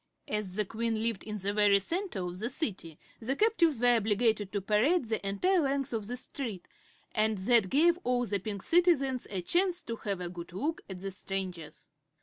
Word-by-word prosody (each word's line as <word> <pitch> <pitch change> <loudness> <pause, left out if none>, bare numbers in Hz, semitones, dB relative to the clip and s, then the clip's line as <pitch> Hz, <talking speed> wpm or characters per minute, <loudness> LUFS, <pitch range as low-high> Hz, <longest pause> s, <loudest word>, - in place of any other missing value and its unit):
As 210 -3 -3
the 210 0 +1
Queen 225 +1 -2
lived 230 -4 -1
in 210 0 -5
the 200 +1 -2
very 205 -1 +5
center 330 - -2
of 180 +1 -6
the 230 +4 -2
city 200 - -3 0.2
the 250 +4 -2
captives 340 - +2
were 245 0 +5
obliged 215 -1 +1
to 205 - -1
parade 225 - +2
the 220 -2 -2
entire 200 - +1
length 275 -4 -1
of 215 -3 -3
this 245 +2 -2
street, 230 -10 -6 0.4
and 215 -1 +1
that 200 0 +3
gave 340 - +4
all 245 0 +1
the 205 -3 -1
Pink 200 0 -5
Citizens 300 -8 +3
a 190 -3 -3
chance 355 - +1
to 230 - -5
have 200 -4 -3
a 180 - -4
good 175 0 -8
look 295 - -2
at 190 - -6
the 195 0 -4
strangers. 185 -4 -5
220 Hz, 195 wpm, -30 LUFS, 195-270 Hz, 0.4 s, very